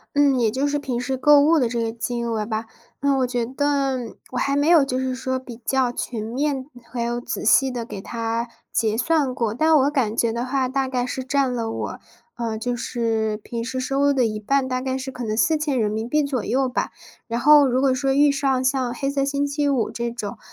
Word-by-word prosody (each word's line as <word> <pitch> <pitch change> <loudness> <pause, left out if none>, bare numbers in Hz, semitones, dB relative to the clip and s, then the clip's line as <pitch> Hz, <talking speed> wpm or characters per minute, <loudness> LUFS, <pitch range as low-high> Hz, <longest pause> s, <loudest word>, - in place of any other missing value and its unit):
嗯， 280 -3 +4
也 225 -2 +3
就 265 +5 0
是 290 0 0
平 250 -4 -3
时 260 +1 -2
购 295 +2 +6
物 310 +2 +4
的 240 -3 +1
这 235 -1 -2
个 225 - -1
金 235 +1 -3
额 220 -2 -1
吧。 220 0 -3 0.4
嗯， 280 -1 +2
我 255 - +1
觉 240 -2 -1
得 270 -2 -1 0.2
我 250 - -4
还 275 +1 +1
没 290 +2 +2
有 335 -4 +6
就 255 -2 -2
是 260 0 -1
说 260 0 -2
比 245 -3 -9
较 260 -2 +1
全 230 -3 -4
面， 265 +3 -2 0.3
还 240 -2 -2
有 240 +1 -2
仔 245 -3 -4
细 265 +4 +5
地 240 -2 -4
给 195 -4 -7
它 230 +1 -3 0.3
结 220 -1 +1
算 290 -2 +1
过， 225 -3 -1
但 315 +6 +3
我 280 +1 +3
感 235 -6 0
觉 230 -1 +2
的 235 +1 -2
话， 260 0 0
大 265 0 -1
概 250 -1 -1
是 260 +1 -4
占 270 -1 +1
了 230 -2 -2
我， - - -4 0.4
呃， 225 -2 -2
就 245 +2 -2
是 225 -3 -1
平 230 +2 -5
时 260 +2 -3
收 270 +2 -1
入 285 0 +4
的 260 -3 +2
一 215 -1 -2
半， 270 +4 +1
大 255 0 -2
概 260 0 -2
是 265 0 -5
可 250 - -7
能 215 0 -2
¥4000 275 -4 +1
左 265 -6 -2
右 265 +1 +1
吧。 250 - -2 0.4
然 235 +1 -2
后 295 +1 +7
如 255 +1 +1
果 270 -1 +3
说， 270 +1 0
遇 285 +1 +5
上 270 -2 0
像 260 -2 +1
黑 275 +3 -2
色 275 -1 0
星 280 +1 0
期 285 0 0
五 255 -5 0
这 235 0 -3
种， 220 -4 -6
255 Hz, 245 characters per minute, -23 LUFS, 235-275 Hz, 0.4 s, 后